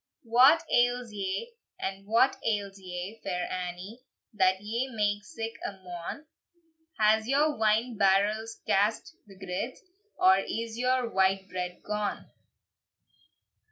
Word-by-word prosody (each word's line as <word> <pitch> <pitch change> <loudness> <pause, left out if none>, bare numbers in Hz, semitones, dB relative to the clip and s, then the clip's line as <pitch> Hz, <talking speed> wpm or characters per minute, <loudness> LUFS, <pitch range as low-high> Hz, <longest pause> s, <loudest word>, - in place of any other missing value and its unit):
"What 260 +8 +6
ails 245 -1 +2
ye, 200 - -3 0.5
what 230 +5 +3
ails 200 -3 -2
ye, 185 +3 -6
Fair 180 -2 -2
Annie, 185 +5 -5 0.3
That 185 -2 +3
ye 230 +6 -2
make 205 -4 -1
sic 225 +1 -6
a - - -3
moan? 185 - -8 0.7
Has 220 0 +3
your 295 +3 +2
wine 220 +2 +1
barrels 210 +3 +2
cast 205 +3 +1
the 195 -2 -15
girds, 190 +6 -4 0.4
Or 190 +1 +6
is 225 +3 -4
your 250 +1 +1
white 190 -2 +1
bread 180 -1 -5
gone? 210 -1 -3
210 Hz, 120 wpm, -29 LUFS, 190-230 Hz, 0.7 s, What